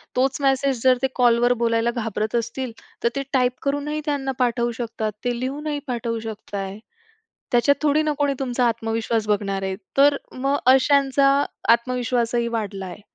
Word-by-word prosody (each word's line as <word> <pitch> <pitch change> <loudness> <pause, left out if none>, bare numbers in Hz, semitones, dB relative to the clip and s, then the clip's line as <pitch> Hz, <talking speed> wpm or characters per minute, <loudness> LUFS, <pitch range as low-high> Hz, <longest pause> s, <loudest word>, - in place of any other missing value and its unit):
तोच 265 +2 +1
मेसेज 270 -2 +1
जर 255 -1 +5
ते 265 - +3
कॉलवर 240 0 +4
बोलायला 230 0 +1
घाबरत 220 -1 -2
असतील, 235 +2 -2 0.3
तर 235 - +4
ते 275 - -1
टाइप 250 -2 +3
करूनही 285 +2 -1
त्यांना 280 -3 -1
पाठवू 240 -1 +1
शकतात, 225 -2 -3
ते 245 -1 -1
लिहूनही 290 +3 -3
पाठवू 235 -2 -2
शकताय. 205 -3 -6 0.7
त्याच्यात 245 +4 +4
थोडी 305 0 +3
ना 305 - +1
कोणी 285 -1 +1
तुमचा 250 -2 0
आत्मविश्वास 225 -1 -1
बघणार 200 -2 0
आहे, 190 0 -2 0.2
तर 285 +1 +6
मग 275 +2 0 0.2
अशांचा 275 0 +3 0.4
आत्मविश्वासही 235 0 +1
वाढला 210 -4 -3
आहे. 185 +2 -9
245 Hz, 150 wpm, -23 LUFS, 230-270 Hz, 0.7 s, तर